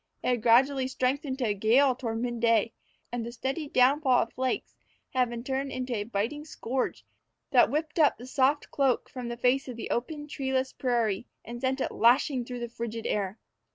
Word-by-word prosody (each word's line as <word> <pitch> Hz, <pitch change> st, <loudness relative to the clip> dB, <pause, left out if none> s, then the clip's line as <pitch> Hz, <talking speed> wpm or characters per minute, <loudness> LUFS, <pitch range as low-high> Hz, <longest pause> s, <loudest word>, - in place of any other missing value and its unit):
It -, -, +1 dB
had 245 Hz, -2 st, +1 dB
gradually 260 Hz, +4 st, +4 dB
strengthened 260 Hz, +1 st, -1 dB
to 255 Hz, -, -1 dB
a 210 Hz, -, +1 dB
gale 240 Hz, +7 st, +4 dB
toward 230 Hz, -3 st, -4 dB
midday, 230 Hz, -2 st, +1 dB, 0.4 s
and 240 Hz, -1 st, -3 dB
the 235 Hz, -, -5 dB
steady 265 Hz, +6 st, -3 dB
downfall 260 Hz, 0 st, +4 dB
of 230 Hz, -, -11 dB
flakes 260 Hz, 0 st, -2 dB, 0.4 s
had 250 Hz, -2 st, +2 dB
been 235 Hz, 0 st, -6 dB
turned 270 Hz, +1 st, -2 dB
into 255 Hz, -1 st, -3 dB
a 205 Hz, -1 st, -2 dB
biting 230 Hz, +7 st, -2 dB
scourge 260 Hz, -4 st, -3 dB, 0.5 s
that -, -, +6 dB
whipped 310 Hz, +2 st, -2 dB
up 300 Hz, -, +4 dB
the 245 Hz, -, -10 dB
soft 270 Hz, +2 st, +1 dB
cloak 270 Hz, -3 st, +1 dB
from 250 Hz, -2 st, -6 dB
the 235 Hz, 0 st, -5 dB
face 255 Hz, +3 st, +2 dB
of 250 Hz, -, -6 dB
the 230 Hz, -, -6 dB
open, 295 Hz, +5 st, -3 dB
treeless 265 Hz, -2 st, -1 dB
prairie 235 Hz, -5 st, 0 dB, 0.2 s
and 240 Hz, +1 st, -7 dB
sent 265 Hz, +1 st, 0 dB
it -, -, -1 dB
lashing 250 Hz, +2 st, +3 dB
through 245 Hz, 0 st, -6 dB
the 240 Hz, -, -2 dB
frigid 230 Hz, -1 st, -5 dB
air. 200 Hz, 0 st, -1 dB
250 Hz, 190 wpm, -28 LUFS, 235-270 Hz, 0.5 s, that